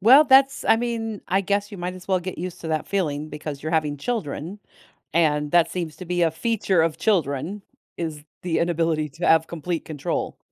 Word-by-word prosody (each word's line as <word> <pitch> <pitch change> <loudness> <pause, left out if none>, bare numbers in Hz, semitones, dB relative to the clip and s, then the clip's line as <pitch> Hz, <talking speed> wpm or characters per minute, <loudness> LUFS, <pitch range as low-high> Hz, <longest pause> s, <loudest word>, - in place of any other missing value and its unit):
Well, 260 +9 +8
that's 270 0 +5
I - - +5
mean, 225 -3 -3
I 190 +1 +3
guess 200 +2 -1
you 200 - -8
might 180 +1 -3
as 185 +1 -12
well 185 -1 +2
get 185 +1 -6
used 180 +1 -5
to 160 - -4
that 155 -1 -1
feeling 155 -6 -1
because 150 -2 -6
you're 155 +2 -3
having 150 -3 +1
children 175 - -4 0.6
and 150 -3 +2
that 175 -1 +4
seems 170 -4 -4
to 185 - -8
be 175 0 0
a 165 - +4
feature 195 0 +1
of 165 -1 0
children, 180 0 0 0.3
is 160 -3 -4 0.2
the 175 -2 0
inability 165 -2 +1
to - - -4
have 160 0 +4
complete 170 0 -3
control. 150 -3 -3
170 Hz, 200 wpm, -24 LUFS, 155-200 Hz, 0.6 s, Well